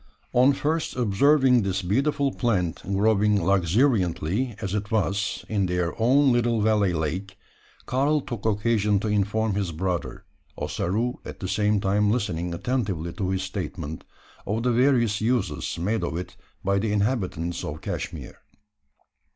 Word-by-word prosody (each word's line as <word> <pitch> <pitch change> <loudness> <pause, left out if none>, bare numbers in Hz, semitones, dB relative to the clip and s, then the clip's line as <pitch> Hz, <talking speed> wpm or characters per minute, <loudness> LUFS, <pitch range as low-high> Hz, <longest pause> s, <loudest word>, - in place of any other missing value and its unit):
On 130 +3 +5
first 155 +3 -1
observing 125 +3 +4
this 95 -2 -1
beautiful 140 +8 +1
plant 95 -9 0
growing 105 +1 +2
luxuriantly, 100 - +1
as 95 0 -4
it 105 -1 -2
was, 100 -2 -1
in 100 -3 0
their 90 -1 -1
own 135 +4 +5
little 120 -1 +2
valley 105 -3 +2
lake, 90 +5 -3 0.5
Karl 140 +4 +1
took 120 -5 -6
occasion 105 -1 +1
to 110 - -3
inform 105 +1 +1
his 95 -3 -1
brother 90 +1 -3 0.3
Ossaroo 115 +7 -2
at - - -9
the 95 - -4
same 105 +2 +1
time 100 +1 +2
listening 90 -7 -1
attentively 90 -4 -2
to 95 -3 -2
his 95 0 -1
statement 90 -5 -5 0.4
of 110 +3 -1
the 125 - +2
various 120 -4 +2
uses 115 -1 -1
made 105 +6 -1
of 80 - -2
it 90 - -6 0.3
by 100 +1 +2
the 110 +1 -1
inhabitants 95 -6 -1
of 75 +1 -5
Cashmeer. - - -5
105 Hz, 145 wpm, -25 LUFS, 95-120 Hz, 0.5 s, On